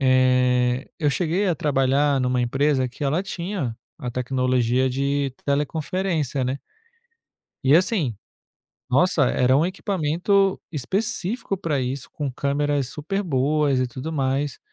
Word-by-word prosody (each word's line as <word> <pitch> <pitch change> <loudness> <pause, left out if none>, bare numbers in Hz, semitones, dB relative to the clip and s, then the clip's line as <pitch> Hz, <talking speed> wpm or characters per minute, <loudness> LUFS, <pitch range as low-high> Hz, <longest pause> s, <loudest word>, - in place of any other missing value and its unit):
eh, 125 -1 +3
eu 150 -2 +3
cheguei 180 +6 0
a 175 - +2
trabalhar 140 0 +2
numa 125 0 +1
empresa 135 +2 +1
que 125 +5 -10
ela 150 +6 +1
tinha 175 - -4 0.2
a 130 -6 -5
tecnologia 125 0 +1
de 140 +1 -1
teleconferência, 150 0 -1
né. 130 +2 -2 1.1
E 135 +3 +6
assim, 175 - +1 0.8
nossa, 150 +3 +3
era 130 +1 +3
um 155 - +3
equipamento 190 +1 +1
específico 200 - -2
pra 160 -7 -1
isso, 130 +1 -3
com 145 -2 -3
câmeras 140 0 0
super 195 +9 -3
boas 145 -3 +1
e 130 - +1
tudo 130 +6 -6
mais. 135 -2 -1
140 Hz, 125 wpm, -23 LUFS, 130-165 Hz, 1.1 s, E